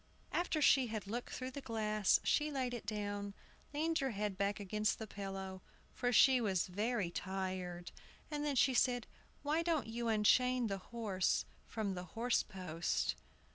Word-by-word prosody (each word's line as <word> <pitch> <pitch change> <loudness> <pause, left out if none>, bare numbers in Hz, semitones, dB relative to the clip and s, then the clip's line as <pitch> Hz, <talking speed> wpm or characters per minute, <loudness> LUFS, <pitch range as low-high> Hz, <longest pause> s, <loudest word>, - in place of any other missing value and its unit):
After 320 -3 +1
she 265 -3 +6
had 215 -2 -4
looked 235 +5 -4
through 255 0 -4
the 280 - -6
glass, 215 -4 +2
she 300 0 +2
laid 260 -4 -1
it 240 - -6
down, 205 -1 -3 0.4
leaned 320 +3 0
her 270 - 0
head 210 -3 -2
back 200 +1 0
against 210 +2 0
the 220 - -5
pillow, 195 -2 -6 0.3
for 245 0 0
she 255 +1 +6
was 190 -6 +1
very 205 0 -1
tired, 185 -2 -4 0.4
and 295 -1 -2
then 290 -2 0
said, 245 -1 +3 0.4
"Why 300 +3 +2
don't 330 -6 +1
you 230 +1 -3
unchain 245 +3 +4
the 195 -3 -2
horse 200 -3 0 0.2
from 210 -3 -2
the 180 -1 -5
horse 240 +1 +3
post?" 175 -4 -1
220 Hz, 160 wpm, -36 LUFS, 195-255 Hz, 0.4 s, she